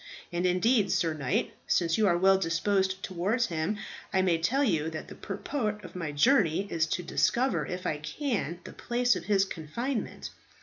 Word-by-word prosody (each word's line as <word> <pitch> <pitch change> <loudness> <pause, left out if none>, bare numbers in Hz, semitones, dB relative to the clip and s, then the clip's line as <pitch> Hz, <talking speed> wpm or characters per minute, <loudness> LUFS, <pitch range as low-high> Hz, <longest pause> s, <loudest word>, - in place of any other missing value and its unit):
And 175 +1 +1
indeed, 200 +2 +3
sir 165 -3 +1
knight, 140 -5 -1
since 165 -2 +2
you 215 -2 +3
are 175 -2 +3
well 190 +1 +5
disposed 190 +2 0
towards 200 +7 0
him, 165 +2 -2 0.3
I 190 - +2
may 170 -3 +2
tell 255 +13 +2
you 160 - +1
that 160 -1 -7
the - - -8
purport 210 -7 -3
of - - -11
my 165 -4 -3
journey 195 - +3
is 165 -1 +1
to 180 - -2
discover 255 +8 +1
if 180 0 -5
I 150 - -1
can 180 - -3
the - - -10
place 245 0 +1
of 170 - -5
his 195 -1 +3
confinement. 220 - -4
185 Hz, 180 wpm, -29 LUFS, 165-215 Hz, 0.3 s, well